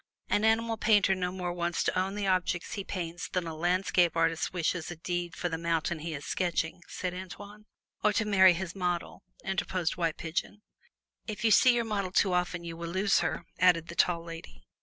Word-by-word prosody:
"An 205 - +2
animal 225 +1 +2
painter 205 -3 +4
no 180 -1 -2
more 180 -1 -3
wants 175 -1 -1
to - - 0
own 190 +2 0
the 205 -1 -2
objects 185 -2 0
he 200 - -3
paints 175 -2 -5
than 180 -2 -1
a 165 -1 -5
landscape 175 0 +2
artist 165 0 +1
wishes 175 -1 -1
a 175 - -5
deed 175 +1 -3
for 175 - -2
the 165 -2 -3
mountain 165 0 -1
he 160 0 -4
is 140 - -7
sketching," 175 -1 -1
said 180 -1 -4
Antoine. 205 +3 -9 0.4
"Or 210 - +5
to 220 - +1
marry 190 -3 +6
his 180 0 -4
model," 180 -2 -2 0.2
interposed 185 -2 -1
White 165 -3 0
Pigeon. 175 +5 -4 0.6
"If 215 +1 -4
you 220 - +4
see 245 +4 +6
your 235 -1 0
model 200 -4 -2
too 190 0 +3
often, 180 0 -1
you 165 -1 -6
will 170 0 -6
lose 190 +3 +2
her," - - -2
added 175 -2 +4
the 170 - -7
Tall 170 -1 +2
Lady. 165 - -10
180 Hz, 200 wpm, -29 LUFS, 170-195 Hz, 0.6 s, marry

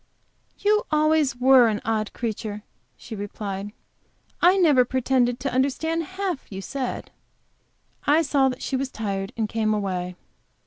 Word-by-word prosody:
"You 425 +3 +2
always 305 -3 +2
were 250 -1 +6
an 215 -2 0
odd 215 -1 -1
creature," 215 -2 -4 0.3
she 230 - -8
replied. 205 0 -5 0.7
"I 360 +3 +6
never 300 -9 +5
pretended 250 -1 +1
to 275 -2 -2
understand 320 +6 0
half 375 - -3
you 190 - -5
said." 260 +5 -4 1.0
I 305 +3 +5
saw 275 -2 +2
that 255 - -6
she 270 - -2
was 265 0 -1
tired, 200 -4 -4
and 220 -2 0
came 215 0 0
away. 180 -3 -3
250 Hz, 140 wpm, -24 LUFS, 210-285 Hz, 1.0 s, were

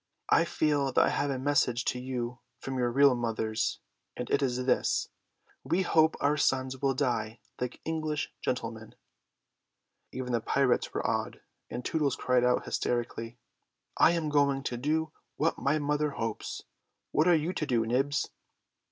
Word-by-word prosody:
"I 165 - +5
feel 145 -4 +1
that - - +5
I - - +2
have 145 - 0
a 135 - -1
message 130 -3 +1
to 125 - 0
you 125 -1 -4 0.2
from 130 +1 -4
your 120 -1 +2
real 140 +1 +6
mothers, 110 -2 -1 0.4
and 125 - -5
it 140 - +3
is 125 -2 0
this: 130 - +1 0.5
'We 170 +8 +1
hope 160 -2 +4
our 145 +1 +2
sons 130 -2 0
will 135 -2 +1
die 120 -4 -1 0.2
like 125 0 -4
English 155 -2 -2
gentlemen.'" 115 -3 -4 1.2
Even 130 0 -4
the 120 -2 +1
pirates 135 +2 +1
were - - -3
awed, - - -1 0.3
and 125 - -5
Tootles 150 -5 +1
cried 125 -1 +2
out 125 0 +2
hysterically, 120 -1 -2 0.6
"I 170 - +5
am 165 -3 -1
going 140 -2 +2
to 125 - -2
do 155 +4 0 0.2
what 160 - 0
my 140 +3 +2
mother 150 0 0
hopes. 115 -5 -4 0.5
What 155 - +3
are 175 - +6
you 160 +3 0
to 155 - -2
do, 120 -4 +2
Nibs?" 135 +5 +1
130 Hz, 160 wpm, -29 LUFS, 120-150 Hz, 1.2 s, real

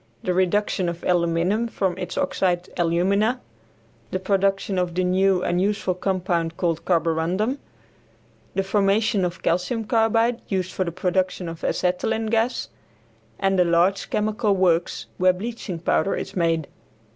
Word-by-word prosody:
The 180 - 0
reduction 185 0 +1
of 170 0 -7
aluminum 175 +5 +1
from 190 -5 -1
its 180 -1 -5
oxide 180 -1 0
alumina; 195 +8 +1 0.7
the - - -1
production 195 0 0
of 175 -1 -2
the 185 - +1
new 185 0 +2
and 175 +1 +1
useful 200 -1 0
compound 180 -3 -1
called 170 -2 -1
carborundum; 175 - 0 1.0
the 195 - +1
formation 200 +1 +2
of 180 -1 -3
calcium 180 +7 0
carbide 225 +1 +2
used 185 -2 -1
for 185 - -1
the 170 - -3
production 185 +1 -1
of 165 0 -8
acetylene 220 +5 0
gas, 230 +2 0 0.7
and 195 -1 +1
a - - +6
large 175 +3 +2
chemical 215 0 +1
works, 175 -3 +1
where 185 0 +5
bleaching 210 -1 -5
powder 175 +3 +1
is - - -6
made. 165 -3 +1
185 Hz, 140 wpm, -23 LUFS, 175-205 Hz, 1.0 s, a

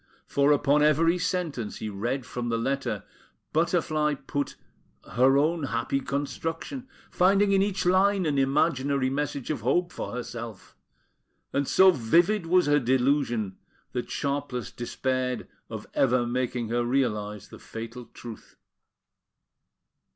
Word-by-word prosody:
For, 140 +1 +2
upon 145 0 +3
every 165 +4 +4
sentence 165 - -2
he 110 - -5
read 120 +6 -3
from 120 -2 -4
the 115 - +1
letter, 135 +4 -2 0.5
Butterfly 155 -2 +1
put 140 +1 -4 0.6
her 130 +2 +5
own 155 +1 +1
happy 125 +2 -1
construction, 165 - -4 0.2
finding 195 +2 +4
in 195 -1 +4
each 195 -2 0
line 190 +1 +3
an 145 -3 +1
imaginary 135 -1 +1
message 145 -1 -2
of 140 -7 -3
hope 175 +10 +1
for - - -5
herself; 115 -4 -7 0.8
and 140 -1 0
so 190 0 +7
vivid 170 - +2
was 180 +1 +4
her 145 0 +4
delusion, 125 -5 +1 0.3
that 125 -1 -4
Sharpless 140 -5 -3
despaired 125 0 -2 0.2
of - - -6
ever 125 -2 +3
making 120 -1 -2
her 120 +1 +1
realise 105 -5 -1
the - - -12
fatal 115 +2 -8
truth. 115 -1 -11
140 Hz, 130 wpm, -27 LUFS, 120-160 Hz, 0.8 s, so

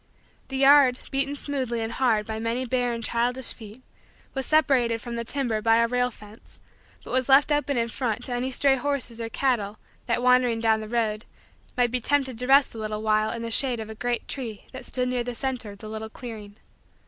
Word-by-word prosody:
The 270 - -4
yard, 275 -2 +6
beaten 275 +1 0
smooth 275 -4 -4
and 225 -1 -2
hard 230 -5 +1
by 220 0 -4
many 230 +3 -2
bare 245 0 0
and 230 0 -4
childish 240 +2 +1
feet, 220 +2 -13 0.5
was 270 -1 -3
separated 260 -7 +3
from 235 +1 -6
the 235 - -3
timber 235 -3 +1
by 225 +1 +4
a 230 0 +3
rail 250 +1 +1
fence 210 -1 -16 0.4
but - - -9
was 260 +1 +1
left 275 +3 +6
open 290 -2 +1
in 230 0 +1
front 240 -1 -3
to 250 - -3
any 245 +2 -1
stray 270 +1 +3
horses 255 -4 -1
or 225 - -4
cattle 220 -5 -1 0.3
that, 240 0 0
wandering 250 -2 +4
down 220 -1 +2
the 215 - -7
road, 220 -2 -1 0.5
might 245 -1 +2
be 250 0 -1
tempted 265 -2 0
to 250 - -2
rest 275 +1 +5
a 225 - -8 0.2
while 215 0 +1
in 230 0 -5
the 230 - -4
shade 250 0 +1
of 220 0 -6
a - - -6
great 240 +2 -3
tree 230 -7 -5
that 260 - -9
stood 250 -1 -1
near 250 -1 -1
the 245 0 -5
center 250 -3 -3
of 200 - -10
the 215 - -10
little 220 0 -6
clearing. 220 -4 -9
240 Hz, 215 wpm, -25 LUFS, 225-260 Hz, 0.5 s, yard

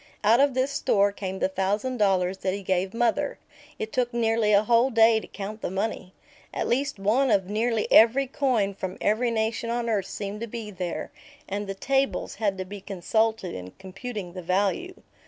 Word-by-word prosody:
Out 225 +4 +5
of 280 -2 +3
this 260 +2 +1
store 200 -7 +2
came 190 -1 -5
the - - +1
thousand 205 +7 -1
dollars 190 -3 +1
that 185 0 -1
he 200 - -7
gave 185 0 0
mother. 240 +5 0 0.4
It 220 - -5
took 245 -1 0
nearly 225 -2 +1
a 205 0 +5
whole 235 +3 +4
day 225 -2 +5
to - - -11
count 210 +2 -7
the - - -2
money. 190 -1 -3 0.4
At - - -1
least 275 +1 0
one 225 +8 +2
of 195 -4 +2
nearly 220 +2 0
every 235 +5 +6
coin 250 -7 0
from 190 -1 -5
every 230 +4 +1
nation 225 0 -1
on 235 0 -1
earth 210 -4 0
seemed 205 +1 -5
to 230 - -3
be 220 -2 -6
there, 180 +3 -4 0.4
and 205 +1 -3
the 195 - -4
"tables" 270 +6 0
had 200 -3 +1
to 185 - -4
be 200 +1 -9
consulted 205 +1 -1
in 90 0 -8
computing 190 0 -7
the 185 - -6
value. 200 - 0
215 Hz, 190 wpm, -26 LUFS, 195-235 Hz, 0.4 s, every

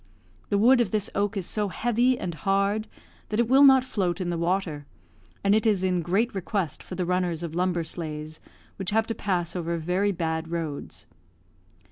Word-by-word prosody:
The 205 - +2
wood 240 +4 +5
of 225 - 0
this 210 0 -1
oak 205 +1 0
is 190 - -2
so 210 +2 0
heavy 240 +5 +1
and 175 - -4
hard 200 +4 0 0.4
that 215 - -1
it 235 - +3
will 265 +3 +6
not 265 -2 +7
float 195 -8 -1
in 175 -2 -2
the 170 - -2
water, 170 -4 -1 0.6
and 200 0 +4
it 220 +2 +3
is 200 -4 +2
in 180 -2 +1
great 200 +9 0
request 190 -3 -2
for 185 - -8
the 180 0 -1
runners 175 -2 0
of 165 -2 -5
lumber 175 -1 0
sleighs, 155 -1 -6 0.4
which 190 -2 -3
have 220 +1 +2
to 225 - -3
pass 180 -6 -2
over 170 -1 -2
very 180 +5 0
bad 160 -2 -2
roads. 145 - -5
185 Hz, 190 wpm, -26 LUFS, 170-210 Hz, 0.6 s, not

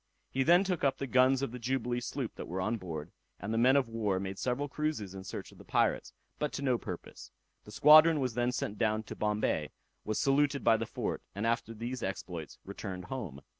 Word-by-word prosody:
He 135 - 0
then 175 +7 +6
took 185 -4 -2
up 135 -1 +2
the 140 - -3
guns 130 +1 +4
of 140 - -2
the 125 - -7
Jubilee 125 0 -1
sloop 120 - -4
that - - -8
were 90 +2 -4
on 110 +5 0
board, 85 -4 -6 0.3
and 105 +4 -4
the - - 0
men 130 +3 +5
of 140 -3 +3
war 105 -4 -1
made 95 0 -5
several 130 +3 -1
cruises 145 -10 -3
in 95 -1 -7
search 95 - -7
of - - -17
the - - -11
pirates, - - +1 0.3
but 150 - -1
to 140 - -4
no 125 -4 +2
purpose. - - -8 0.4
The 105 - -11
squadron 155 +6 +7
was 130 -3 -1
then 120 +1 +1
sent 105 -4 -3
down 110 -1 +1
to - - -8
Bombay, 105 -8 0 0.3
was 110 0 -2
saluted 140 0 +2
by 115 -1 +5
the 115 0 -3
fort, - - -3
and 100 +2 -2
after 115 0 0
these 120 +3 -4
exploits 90 -5 -5
returned 95 -2 -6
home. 85 - -6
115 Hz, 220 wpm, -31 LUFS, 100-135 Hz, 0.4 s, squadron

